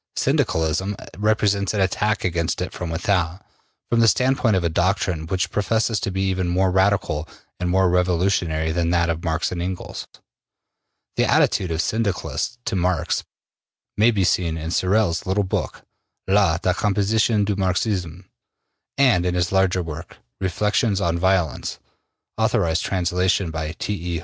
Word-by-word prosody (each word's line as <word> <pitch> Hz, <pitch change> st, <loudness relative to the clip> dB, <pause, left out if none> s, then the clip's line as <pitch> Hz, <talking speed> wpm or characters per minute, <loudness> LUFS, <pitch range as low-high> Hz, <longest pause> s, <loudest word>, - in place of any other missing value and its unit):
Syndicalism 80 Hz, +5 st, 0 dB, 0.2 s
represents 105 Hz, -1 st, +1 dB
an 100 Hz, -, +1 dB
attack 105 Hz, +3 st, 0 dB
against 85 Hz, -2 st, -1 dB
it -, -, -4 dB
from 90 Hz, -, -5 dB
without, 90 Hz, +1 st, -1 dB, 0.4 s
from 120 Hz, -, +1 dB
the 115 Hz, -, +5 dB
standpoint 125 Hz, -2 st, +3 dB
of 95 Hz, -, 0 dB
a -, -, +2 dB
doctrine 90 Hz, -1 st, 0 dB
which 95 Hz, +2 st, -1 dB
professes 110 Hz, +1 st, 0 dB
to -, -, -2 dB
be 95 Hz, 0 st, -2 dB
even 95 Hz, -1 st, 0 dB
more 90 Hz, +2 st, +2 dB
radical 95 Hz, -5 st, +1 dB, 0.3 s
and 90 Hz, -1 st, -1 dB
more 95 Hz, +1 st, +3 dB
revolutionary 90 Hz, -3 st, +1 dB
than 85 Hz, 0 st, 0 dB
that 85 Hz, -1 st, +2 dB
of 80 Hz, 0 st, -5 dB
Marx 80 Hz, 0 st, -1 dB
and 90 Hz, -1 st, -3 dB
Engels. 90 Hz, +1 st, -5 dB, 1.1 s
The -, -, +2 dB
attitude 95 Hz, -, +2 dB
of 80 Hz, 0 st, 0 dB
Syndicalists 100 Hz, -, -2 dB
to 110 Hz, -, -1 dB
Marx 90 Hz, -2 st, 0 dB, 0.7 s
may 110 Hz, +3 st, +4 dB
be 105 Hz, -5 st, +1 dB
seen 85 Hz, -2 st, +1 dB
in 80 Hz, +1 st, -4 dB
Sorel's 95 Hz, -2 st, +1 dB
little 100 Hz, +2 st, +1 dB
book, 95 Hz, -, -3 dB, 0.4 s
``La 95 Hz, -4 st, +3 dB
Decomposition 105 Hz, +3 st, +1 dB
du 105 Hz, 0 st, -1 dB
Marxisme,'' 95 Hz, -2 st, -1 dB, 0.7 s
and 125 Hz, -11 st, +4 dB
in 90 Hz, 0 st, -1 dB
his 90 Hz, -1 st, 0 dB
larger 95 Hz, -2 st, +2 dB
work, 80 Hz, -2 st, -8 dB, 0.2 s
``Reflections 100 Hz, +2 st, +1 dB
on 85 Hz, -3 st, 0 dB
Violence,'' 90 Hz, -6 st, 0 dB, 0.6 s
authorized 80 Hz, 0 st, +1 dB
translation 90 Hz, -1 st, 0 dB
by 80 Hz, 0 st, -4 dB
T. 90 Hz, -2 st, -4 dB
E. -, -, -2 dB
90 Hz, 150 wpm, -22 LUFS, 85-100 Hz, 1.1 s, the